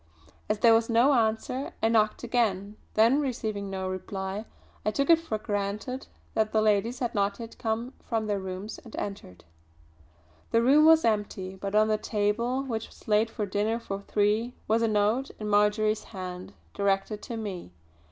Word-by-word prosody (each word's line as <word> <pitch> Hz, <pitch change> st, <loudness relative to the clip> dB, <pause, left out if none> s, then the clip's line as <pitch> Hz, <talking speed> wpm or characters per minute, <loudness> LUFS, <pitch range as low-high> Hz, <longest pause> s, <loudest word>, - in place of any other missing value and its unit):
As 215 Hz, -, +1 dB
there 230 Hz, +2 st, +6 dB
was 225 Hz, +1 st, +3 dB
no 240 Hz, +5 st, +5 dB
answer 230 Hz, +3 st, 0 dB
I -, -, +5 dB
knocked 220 Hz, -1 st, +2 dB
again; 215 Hz, -4 st, 0 dB, 0.2 s
then 230 Hz, +7 st, +5 dB
receiving 215 Hz, -7 st, -3 dB
no 190 Hz, -1 st, -3 dB
reply 190 Hz, +2 st, -4 dB, 0.4 s
I -, -, +1 dB
took 280 Hz, +8 st, +2 dB
it 330 Hz, -, +7 dB
for 320 Hz, -10 st, -3 dB
granted 210 Hz, +5 st, -3 dB, 0.3 s
that 215 Hz, -1 st, +1 dB
the 220 Hz, -, +3 dB
ladies 215 Hz, +3 st, +2 dB
had 245 Hz, -3 st, -2 dB
not 200 Hz, +1 st, 0 dB
yet 230 Hz, -1 st, -8 dB
come 230 Hz, +3 st, -2 dB, 0.2 s
from 225 Hz, -2 st, 0 dB
their 205 Hz, -2 st, -1 dB
rooms 190 Hz, +3 st, -6 dB
and 230 Hz, -, -12 dB
entered. 90 Hz, -, -6 dB, 1.1 s
The 230 Hz, 0 st, +3 dB
room 290 Hz, +5 st, +6 dB
was 320 Hz, 0 st, +6 dB
empty 205 Hz, -4 st, -1 dB
but 195 Hz, +1 st, -5 dB
on 215 Hz, 0 st, +5 dB
the 215 Hz, -1 st, +1 dB
table 230 Hz, +5 st, 0 dB
which 225 Hz, -5 st, -3 dB
was -, -, -19 dB
laid 215 Hz, +1 st, +3 dB
for 220 Hz, -2 st, -3 dB
dinner 205 Hz, +3 st, 0 dB
for 200 Hz, -4 st, -5 dB
three 215 Hz, +4 st, 0 dB
was 225 Hz, +2 st, +2 dB
a 230 Hz, -, +3 dB
note 215 Hz, +5 st, +1 dB
in 215 Hz, -, -4 dB
Marjory's 210 Hz, +1 st, +2 dB
hand 180 Hz, -, -7 dB, 0.2 s
directed 200 Hz, +1 st, 0 dB
to 235 Hz, -, -6 dB
me. 195 Hz, -, -6 dB
215 Hz, 175 wpm, -28 LUFS, 200-230 Hz, 1.1 s, it